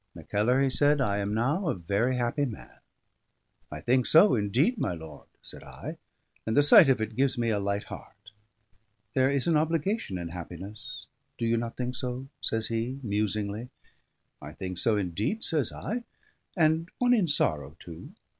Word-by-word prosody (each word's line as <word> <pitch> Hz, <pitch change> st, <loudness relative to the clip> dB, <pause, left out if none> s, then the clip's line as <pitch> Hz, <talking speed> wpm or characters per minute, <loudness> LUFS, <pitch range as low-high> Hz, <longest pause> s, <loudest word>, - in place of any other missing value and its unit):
"Mackellar," 105 Hz, -, +1 dB
he 135 Hz, -, +2 dB
said, 145 Hz, +2 st, +3 dB
"I 100 Hz, -6 st, +1 dB
am 100 Hz, 0 st, -2 dB
now 140 Hz, -, 0 dB
a -, -, 0 dB
very 100 Hz, +8 st, 0 dB
happy 125 Hz, +4 st, 0 dB
man." 115 Hz, -6 st, -9 dB, 0.9 s
"I -, -, -6 dB
think 125 Hz, +1 st, +2 dB
so 180 Hz, +6 st, +6 dB
indeed, 125 Hz, -, +1 dB
my 90 Hz, -, -1 dB
lord," 80 Hz, -3 st, -11 dB, 0.2 s
said -, -, -5 dB
I, -, -, -8 dB, 0.5 s
"and 110 Hz, -, -1 dB
the 145 Hz, -, +7 dB
sight 145 Hz, 0 st, +8 dB
of 130 Hz, -, +3 dB
it 110 Hz, 0 st, -3 dB
gives 135 Hz, +1 st, +1 dB
me 115 Hz, -1 st, +1 dB
a 105 Hz, -, +1 dB
light 100 Hz, +1 st, -1 dB
heart." 105 Hz, +1 st, -12 dB, 0.8 s
"There 130 Hz, 0 st, +3 dB
is 140 Hz, -2 st, +1 dB
an 170 Hz, -, +2 dB
obligation 165 Hz, -, -1 dB
in 85 Hz, -1 st, -5 dB
happiness 90 Hz, +4 st, -8 dB, 0.3 s
do 115 Hz, -, -2 dB
you 115 Hz, 0 st, +2 dB
not 115 Hz, 0 st, -3 dB
think 125 Hz, 0 st, -2 dB
so?" 125 Hz, +1 st, -4 dB
says 110 Hz, -1 st, -1 dB
he 115 Hz, +4 st, -2 dB
musingly. 105 Hz, +1 st, -2 dB, 0.7 s
"I 75 Hz, +2 st, -9 dB
think 90 Hz, 0 st, -5 dB
so 110 Hz, +1 st, +2 dB
indeed," 105 Hz, -, -2 dB
says 150 Hz, -8 st, +2 dB
I, 235 Hz, +4 st, -4 dB, 0.5 s
"and 160 Hz, +1 st, +2 dB
one 245 Hz, 0 st, +3 dB
in 210 Hz, -7 st, +3 dB
sorrow 75 Hz, -, 0 dB
too. 85 Hz, -2 st, -10 dB
115 Hz, 175 wpm, -28 LUFS, 100-140 Hz, 0.9 s, sight